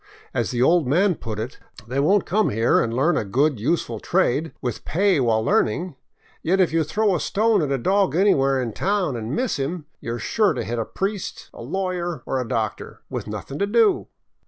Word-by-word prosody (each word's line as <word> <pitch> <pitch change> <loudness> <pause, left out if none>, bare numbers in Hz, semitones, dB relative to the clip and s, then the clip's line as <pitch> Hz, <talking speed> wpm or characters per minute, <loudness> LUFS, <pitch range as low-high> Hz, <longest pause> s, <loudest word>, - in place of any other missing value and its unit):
As - - 0
the 125 0 +1
old 165 0 +3
man 180 +8 +3
put 115 -9 -6
it, 110 +4 -5 0.3
They 130 +3 -2
won't 190 +7 +3
come 215 +2 +2
here 115 +3 +2
and 115 - -1
learn 145 +8 +2
a - - 0
good, 130 +6 +1
useful 120 -3 -1
trade, 155 +10 +1
with 125 -4 -4
pay 190 0 +2
while 115 -3 +2
learning; 165 +12 +1 0.5
yet 190 +4 +1
if 180 -4 +3
you 165 -1 +3
throw 205 +6 +1
a - - 0
stone 220 0 +2
at 145 -3 -1
a 135 - +1
dog 190 +4 +1
anywhere 135 -8 +3
in 120 -4 -3
town 190 - 0
and 115 +4 -4
miss 255 -2 -1
him, 150 +4 -3
you 115 +1 -4
are - - -6
sure 210 - +2
to - - -3
hit 120 +1 -3
a 115 - -1
priest, 195 0 -4
a - - -10
lawyer, 180 -3 -3
or 130 - -1
a 125 - -5
doctor 110 -2 -3
— - - -50
with - - -4
nothing 140 - -6
to 200 - +1
do." 225 0 +3
155 Hz, 215 wpm, -23 LUFS, 120-190 Hz, 0.5 s, old